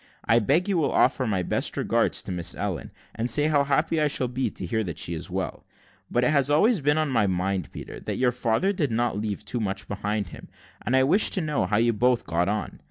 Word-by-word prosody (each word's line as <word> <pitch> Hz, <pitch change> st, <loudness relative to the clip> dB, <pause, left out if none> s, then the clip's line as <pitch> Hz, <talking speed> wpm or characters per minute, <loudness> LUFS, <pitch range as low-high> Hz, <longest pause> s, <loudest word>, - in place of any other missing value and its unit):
I 115 Hz, +1 st, +4 dB
beg 145 Hz, -, +2 dB
you 195 Hz, -4 st, +1 dB
will 155 Hz, -, +1 dB
offer 130 Hz, -, +2 dB
my 95 Hz, -4 st, 0 dB
best -, -, -1 dB
regards -, -, 0 dB
to -, -, -6 dB
Miss 85 Hz, -1 st, -2 dB
Ellen, 95 Hz, -9 st, -4 dB, 0.2 s
and 115 Hz, +2 st, -2 dB
say 150 Hz, +6 st, +3 dB
how 145 Hz, -2 st, +3 dB
happy 155 Hz, +3 st, +1 dB
I 150 Hz, -, +3 dB
shall 130 Hz, -3 st, +1 dB
be 125 Hz, +2 st, -2 dB
to -, -, -7 dB
hear 110 Hz, -2 st, -1 dB
that 85 Hz, -6 st, -6 dB
she 85 Hz, -, -2 dB
is 80 Hz, -, -5 dB
well; -, -, -4 dB, 0.5 s
but 120 Hz, -, +1 dB
it 125 Hz, -, +3 dB
has 140 Hz, -2 st, +2 dB
always 200 Hz, +9 st, +3 dB
been 145 Hz, +2 st, +2 dB
on 155 Hz, -3 st, 0 dB
my 110 Hz, -5 st, +2 dB
mind, 95 Hz, -1 st, -2 dB
Peter, -, -, -8 dB
that -, -, -4 dB
your 125 Hz, -1 st, +2 dB
father 125 Hz, -, 0 dB
did 155 Hz, -7 st, -1 dB
not 115 Hz, -2 st, 0 dB
leave 105 Hz, -2 st, -4 dB
too 120 Hz, -, -3 dB
much 100 Hz, -3 st, -3 dB
behind 100 Hz, -1 st, -2 dB
him, -, -, -11 dB, 0.4 s
and 125 Hz, -, +1 dB
I 130 Hz, -, +5 dB
wish 185 Hz, +11 st, +5 dB
to 190 Hz, -, -1 dB
know 150 Hz, -, -1 dB
how 105 Hz, +2 st, +1 dB
you 115 Hz, +1 st, +3 dB
both 125 Hz, +3 st, +1 dB
get 85 Hz, +3 st, 0 dB
on. 105 Hz, +1 st, -3 dB
120 Hz, 245 wpm, -25 LUFS, 100-145 Hz, 0.5 s, I